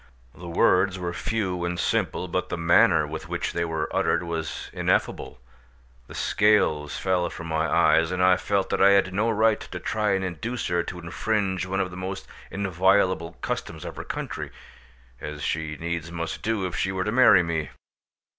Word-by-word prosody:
The 90 - -10
words 95 +2 +3
were 90 -1 -4
few 95 -4 -2
and 85 0 -2
simple, 90 - 0
but 90 +1 -2
the 90 - -3
manner 85 +1 +4
with - - -7
which - - -2
they 85 - 0
were 80 -1 -2
uttered 85 - +1
was 85 -2 -5
ineffable: - - -1 0.7
the - - -11
scales 80 -9 +2
fell 90 -2 0
from 85 - -8
my 80 0 0
eyes, 80 0 +4
and 90 0 -3
I 90 0 +6
felt 100 +1 -1
that - - 0
I 100 +1 +7
had 95 -2 +2
no 105 +4 +1
right 110 0 +3
to 90 - -7
try 105 +1 0
and 95 -1 0
induce 110 +8 -4
her 85 0 +1
to 90 - -6
infringe 95 +1 -1
one 95 +1 -1
of 95 -1 -1
the 90 - -9
most 95 +1 -5 0.2
inviolable 95 -2 +1
customs - - -4
of - - -6
her - - -6
country, - - -5 0.7
as 75 -1 -7
she 80 -1 -2
needs 85 0 -4
must 85 -1 -4
do 110 -3 -1
if 90 - -4
she 95 - 0
were 95 -1 -1
to 105 - -2
marry 125 -7 +6
me. 80 -4 -2
90 Hz, 185 wpm, -25 LUFS, 85-95 Hz, 0.7 s, I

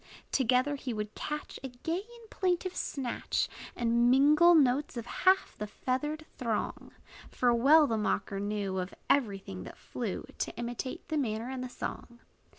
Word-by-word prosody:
Together 260 +2 +2
he 255 -4 -4
would 210 0 -4
catch 300 0 -5
A - - -2
gay 325 +8 -3
and 465 +1 -16
plaintive 365 -1 0
snatch, 265 -8 -1 0.3
And 235 0 +3
mingle 300 +7 +6
notes 275 -2 +3
of 230 - -4
half 375 +8 +2
the 210 - -3
feathered 295 +8 -2
throng. 230 -4 -2 0.4
For 245 -1 +2
well 290 +7 +6
the 225 -5 0
mocker 200 -1 -1
knew, 200 -2 -2
Of 185 +1 -5 0.2
every 225 -8 +2
thing 95 - -8
that - - -10
flew, - - -4
To - - -3
imitate 240 +2 -4
the 315 - 0
manner 230 -1 -2
and 260 -1 -4
the 255 - -5
song. 240 -1 -6
255 Hz, 160 wpm, -31 LUFS, 225-300 Hz, 0.4 s, mingle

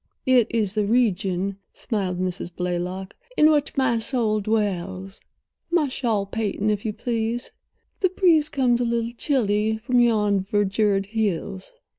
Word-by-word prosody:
"It 255 -4 +4
is 215 -4 0
the 210 -2 0
region," 200 -4 +1 0.2
smiled 190 -5 -2
Mrs. 185 -1 -3
Blaylock, 180 +2 -3 0.2
"in 310 +1 +6
which 290 -2 0
my 260 -4 +2
soul 225 -3 0
dwells. 195 -3 -2 0.5
My 335 -5 +2
shawl, 230 -6 -1
Peyton, 215 0 -1
if 205 0 -3
you 215 - 0
please—the 235 - -4
breeze 340 -5 +3
comes 245 -3 +1
a - - +2
little 235 0 -1
chilly 220 -5 +1
from 245 +3 +1
yon 210 -4 +3
verdured 200 0 +1
hills." 200 - -3
215 Hz, 135 wpm, -23 LUFS, 195-240 Hz, 0.5 s, in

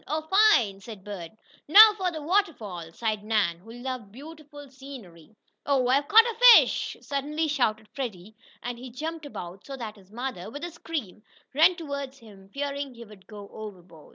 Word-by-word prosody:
"Oh, 310 +1 -2 0.3
fine!" 200 -4 +1
said 200 -1 -10
Bert. 195 -5 -7 0.4
"Now 425 +7 +9
for 375 -3 -1
the 315 -3 -7
waterfall!" 255 - -1
sighed 215 +2 -3
Nan, 210 -6 0
who 220 +6 -14
loved 245 -3 -6
beautiful 290 +2 -12
scenery. 225 - -13 0.3
"Oh, 270 -3 +1
I've 280 +2 +2
caught 450 +2 +7
a 470 -2 -3 0.2
fish!" - - 0
suddenly 295 +3 -2
shouted 220 -7 0
Freddie 215 -6 -7 0.3
and 240 0 -5
he 255 +1 -9
jumped 310 +5 -6
about 185 -7 -9
so 275 -1 -8
that 220 -4 -7
his 195 -1 -20
mother, 235 -5 -5
with 290 +7 -8
a 345 - -5
scream, 300 - -6 0.3
ran 325 +6 +5
toward 280 -5 -6
him, 205 -6 -16
fearing 280 +1 -4
he 235 0 -11
would 205 -3 -17
go 205 -2 -10
overboard. 185 -7 -11
250 Hz, 175 wpm, -26 LUFS, 205-290 Hz, 0.4 s, Now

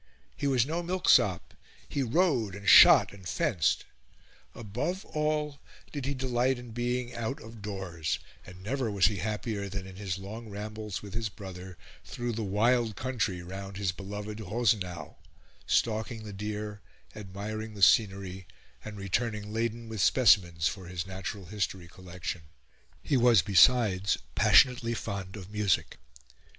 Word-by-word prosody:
He 140 - -2
was 130 -4 +3
no 165 +4 -2
milksop; 170 - +2 0.3
he 140 - -2
rode, 130 - +1
and 100 0 -9
shot, - - +8
and 95 -3 -9
fenced; 95 - +1 0.7
above 125 - -4
all 150 -2 -1 0.3
did 145 -4 -4
he 140 - -1
delight 130 0 0
in 120 -1 -10
being 120 +1 -2
out 115 +3 -3
of 115 -1 -12
doors, 95 -6 -3 0.3
and 90 +1 -13
never 125 +2 -1
was 100 -3 +2
he 105 -1 +2
happier 105 +1 -3
than 95 0 -5
in 95 -1 -11
his 95 -3 -3
long 110 +4 -8
rambles 105 0 -6
with 100 -1 -9
his 110 -1 -2
brother 95 -3 -9 0.3
through 120 0 -4
the 115 0 -3
wild 110 +2 +2
country 110 -7 -2
round 95 +2 -7
his 100 -2 0
beloved 105 +3 -7
Rosenau 100 -8 -1 0.5
stalking 110 0 0
the 105 -1 -8
deer, 105 +1 -5 0.3
admiring 105 +2 -6
the 100 - -2
scenery, 95 -4 +3 0.4
and 105 -1 -8
returning 105 +1 -2
laden 115 0 -2
with 110 -3 -4
specimens 90 -9 +4
for 95 -3 -5
his 90 -1 -4
natural 95 +1 -6
history 95 -3 -3
collection. 90 -1 -7 0.6
He 140 - +2
was, 120 -4 +5
besides, 100 0 +4 0.2
passionately 120 -3 +4
fond 100 -3 -5
of 100 -1 -9
music. 105 -3 0
105 Hz, 145 wpm, -29 LUFS, 95-120 Hz, 0.7 s, shot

